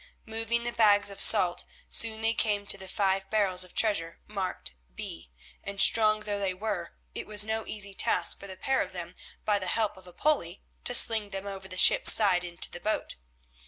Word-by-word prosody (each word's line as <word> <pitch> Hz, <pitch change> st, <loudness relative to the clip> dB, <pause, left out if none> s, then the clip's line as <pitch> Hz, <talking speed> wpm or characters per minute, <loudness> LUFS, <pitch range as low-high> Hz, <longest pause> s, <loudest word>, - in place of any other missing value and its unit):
Moving 225 Hz, +1 st, -3 dB
the 240 Hz, -, -5 dB
bags 205 Hz, -3 st, +1 dB
of 200 Hz, -, -5 dB
salt, 175 Hz, -1 st, +6 dB, 0.2 s
soon 220 Hz, -1 st, +3 dB
they 225 Hz, +1 st, 0 dB
came 205 Hz, -3 st, -3 dB
to 200 Hz, -, +1 dB
the 190 Hz, -, -11 dB
five 195 Hz, 0 st, -3 dB
barrels 195 Hz, -4 st, +1 dB
of 180 Hz, -, -14 dB
treasure 185 Hz, -7 st, -1 dB
marked 190 Hz, -, -7 dB, 0.2 s
B, 80 Hz, +1 st, -10 dB, 0.3 s
and, 200 Hz, 0 st, -9 dB
strong 215 Hz, 0 st, +3 dB
though 205 Hz, -1 st, -5 dB
they 190 Hz, -2 st, -4 dB
were, 195 Hz, -4 st, -7 dB, 0.2 s
it -, -, -8 dB
was 210 Hz, -1 st, +2 dB
no 220 Hz, 0 st, -5 dB
easy 200 Hz, -2 st, -5 dB
task -, -, -1 dB
for 200 Hz, -, -12 dB
the 190 Hz, -1 st, -12 dB
pair 265 Hz, +7 st, -2 dB
of -, -, -7 dB
them -, -, -8 dB, 0.3 s
by 210 Hz, -1 st, 0 dB
the -, -, -8 dB
help 215 Hz, -3 st, -3 dB
of 185 Hz, -1 st, -18 dB
a -, -, -14 dB
pulley 200 Hz, -, -3 dB, 0.2 s
to 245 Hz, -, -1 dB
sling 220 Hz, -3 st, +4 dB
them 195 Hz, 0 st, -8 dB
over 195 Hz, -1 st, -9 dB
the 185 Hz, -1 st, -10 dB
ship's -, -, +8 dB
side 190 Hz, -5 st, +2 dB
into 175 Hz, 0 st, -8 dB
the 175 Hz, -, -10 dB
boat. 215 Hz, +4 st, -4 dB
205 Hz, 205 wpm, -26 LUFS, 190-220 Hz, 0.3 s, ship's